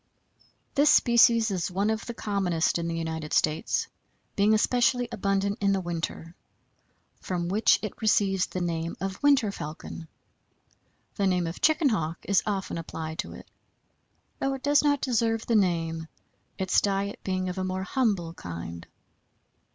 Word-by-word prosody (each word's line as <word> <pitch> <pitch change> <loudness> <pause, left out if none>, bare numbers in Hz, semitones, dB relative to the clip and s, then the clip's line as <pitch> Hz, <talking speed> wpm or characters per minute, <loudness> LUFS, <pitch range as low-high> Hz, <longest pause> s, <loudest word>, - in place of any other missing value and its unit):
This 295 +1 +4
species 235 -3 +5
is 185 -1 -1
one 200 +4 0
of 220 0 -3
the 235 - -5
commonest 180 -7 0
in 170 - -2
the 165 0 -2
United 160 -2 -4
States, 155 0 +1 0.5
being 210 +2 +4
especially 245 +2 +2
abundant 200 -2 -1
in 200 0 +3
the 195 - +1
winter, 165 -1 -4 0.9
from 175 -2 -3
which 210 +4 +4
it 215 - -6
receives 195 -3 +2
the 185 - -4
name 165 -1 -2
of 195 0 -4
Winter 275 -8 +4
Falcon. 160 0 -8 1.1
The 200 -2 +2
name 180 -2 +1
of 165 +1 -6
Chicken 310 -2 +4
Hawk 165 -7 -1
is 200 -1 +2
often 195 -4 -2
applied 160 -1 -6
to - - -4
it, - - -12 0.9
though 270 0 0
it 265 - -10
does 290 +1 +4
not 285 -2 +2
deserve 225 -3 0
the 230 - +1
name, 165 -5 0 0.5
its 190 -1 +2
diet 200 0 -1
being 185 -1 -1
of 180 +1 -4
a - - -1
more 185 0 -2
humble 200 -8 0
kind. 85 - -8
195 Hz, 155 wpm, -27 LUFS, 170-220 Hz, 1.1 s, species